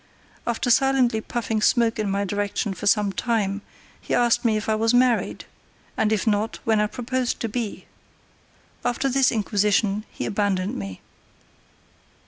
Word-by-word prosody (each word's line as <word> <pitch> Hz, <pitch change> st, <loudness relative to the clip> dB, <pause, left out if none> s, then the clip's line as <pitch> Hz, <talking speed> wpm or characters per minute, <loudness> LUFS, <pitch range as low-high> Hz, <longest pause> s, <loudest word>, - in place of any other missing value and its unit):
After 240 Hz, +1 st, 0 dB
silently 255 Hz, -3 st, +3 dB
puffing 225 Hz, -1 st, -2 dB
smoke 230 Hz, -1 st, +2 dB
in 210 Hz, -2 st, 0 dB
my 200 Hz, +1 st, 0 dB
direction 205 Hz, +1 st, -2 dB
for 190 Hz, -, -5 dB
some 205 Hz, -1 st, +3 dB
time, 210 Hz, -3 st, -1 dB, 0.4 s
he -, -, -1 dB
asked 240 Hz, -1 st, +3 dB
me 225 Hz, -3 st, +2 dB
if 215 Hz, -, -4 dB
I 220 Hz, -, +2 dB
was 225 Hz, +2 st, +2 dB
married, 245 Hz, -1 st, +2 dB, 0.5 s
and 215 Hz, -1 st, +1 dB
if 215 Hz, -3 st, +1 dB
not, 215 Hz, 0 st, 0 dB
when 220 Hz, -2 st, +2 dB
I 210 Hz, -, +2 dB
proposed 250 Hz, +2 st, -2 dB
to 230 Hz, -, 0 dB
be. 225 Hz, -1 st, -4 dB, 1.0 s
After 265 Hz, +3 st, 0 dB
this 270 Hz, 0 st, +3 dB
inquisition 210 Hz, -1 st, +1 dB
he -, -, -5 dB
abandoned 200 Hz, -2 st, -1 dB
me. 95 Hz, -2 st, -6 dB
220 Hz, 150 wpm, -24 LUFS, 205-240 Hz, 1.0 s, silently